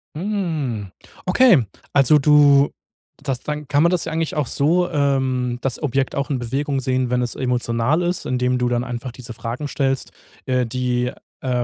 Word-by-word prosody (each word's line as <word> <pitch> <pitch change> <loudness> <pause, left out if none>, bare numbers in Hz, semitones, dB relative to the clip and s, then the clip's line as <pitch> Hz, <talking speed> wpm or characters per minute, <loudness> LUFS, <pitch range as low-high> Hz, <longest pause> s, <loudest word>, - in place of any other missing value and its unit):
Mm, 155 - -2 0.4
okay, 180 - +5 0.3
also 140 +2 +5
du 145 -1 +5 0.5
das 135 -4 -2
dann 150 -1 -5
kann 145 +1 +2
man 170 - +5
das 180 -2 0
ja - - -4
eigentlich 160 -1 -2
auch 150 -2 0
so, 170 +8 +2
ähm 130 -4 0
das 135 +2 -2
Objekt 135 -2 0
auch 140 0 -2
in 140 - 0
Bewegung 135 +4 -2
sehen, 130 -1 0
wenn 125 0 +1
es 120 - -2
emotional 125 +3 0
ist, 175 0 -1
indem 125 0 +1
du 125 0 +1
dann 120 0 0
einfach 125 0 -5
diese 120 0 -9
Fragen 120 +5 -5
stellst, 135 -2 -1 0.3
äh, 125 -2 +1
die, 125 0 -1 0.3
äh, 130 - -3
135 Hz, 175 wpm, -21 LUFS, 125-150 Hz, 0.5 s, okay